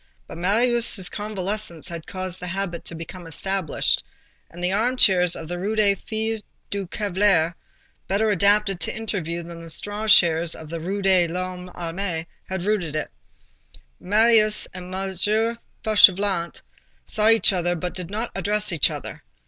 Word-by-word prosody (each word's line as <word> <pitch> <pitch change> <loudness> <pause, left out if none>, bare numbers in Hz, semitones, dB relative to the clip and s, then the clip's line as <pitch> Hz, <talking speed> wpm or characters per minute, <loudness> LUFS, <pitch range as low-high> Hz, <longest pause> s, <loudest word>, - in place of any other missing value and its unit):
But - - -10
Marius' 225 0 +2
convalescence 205 -4 -4
had 170 -2 -7
caused 185 -1 -5
the 180 - -5
habit 180 -1 -3
to 170 - -5
become 165 +1 -9
established, 190 0 0 0.5
and 175 +1 -10
the 180 - +1
armchairs 200 -6 +4
of 160 - -8
the 175 +1 -4
Rue 205 +4 -2
des 205 -2 +4
Filles 220 +2 -3 0.3
du 200 -2 -3
Calvaire, 190 -4 +2 0.5
better 210 +3 +1
adapted 200 0 +3
to - - -1
interviews 170 -6 -2
than 170 0 -9
the 165 0 -10
straw 205 +6 -3
chairs 170 -4 +5
of 155 -1 -11
the 165 - -4
Rue 195 +5 -3
de 185 -3 +4
l'Homme 180 +1 -5
Armé, 170 -1 -3 0.2
had 190 -1 -3
rooted 185 -8 -1
it. 155 - -3 0.9
Marius 215 +1 +3
and 180 -1 -8
M. 190 0 -3 0.7
Fauchelevent 195 -4 +3 0.4
saw 215 +1 +1
each 225 -2 +4
other, 175 -1 0
but 175 +1 -4
did 180 -2 -6
not 220 +4 -4
address 210 0 0
each 160 - +3
other. - - -7
190 Hz, 155 wpm, -23 LUFS, 175-210 Hz, 0.9 s, chairs